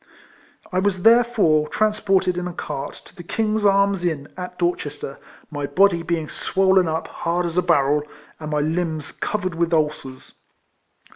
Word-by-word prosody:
I 185 - +1
was 190 -2 0
therefore 225 -10 +4
transported 200 -2 +1
in 180 0 -3
a 180 - -6
cart 145 -5 -5
to - - -17
the 180 - -9
King's 215 +4 -1
Arms 200 -2 +3
Inn, 155 -5 -2
at 180 0 -7
Dorchester, 150 -5 -3 0.3
my 145 -2 -3
body 180 +3 +3
being 165 -2 -2
swollen 190 0 +2
up 160 0 -2
hard 175 +1 -2
as 170 -1 -4
a 180 - +3
barrel, 150 -4 +2 0.4
and 155 -1 -6
my 150 -1 0
limbs 160 -1 -2
covered 195 -4 -3
with 170 0 -1
ulcers. 150 -5 -2
175 Hz, 155 wpm, -22 LUFS, 155-195 Hz, 0.4 s, therefore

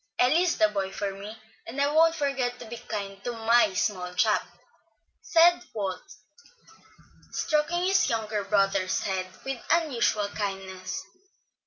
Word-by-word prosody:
"Eli 260 +7 +5
is 360 -1 +1
the 215 - +5
boy 195 -2 -2
for 200 0 -3
me, 205 +3 -9 0.3
and 245 +5 -6
I 280 - +4
won't 325 +1 +5
forget 270 -5 -1
to - - -10
be 230 - -7
kind 200 -3 -6
to 245 - -3
my 230 -1 +3
small 185 -3 -1
chap," 220 -1 +3 0.8
said 345 +1 +5
Walt, 195 -3 -3 1.3
stroking 325 +3 0
his 385 +1 +3
younger 215 -2 -1
brother's 195 -2 +1
head 190 -2 -2 0.2
with 270 -2 -4
unusual 240 -10 +1
kindness. 190 -2 -5
220 Hz, 140 wpm, -27 LUFS, 195-275 Hz, 1.3 s, Eli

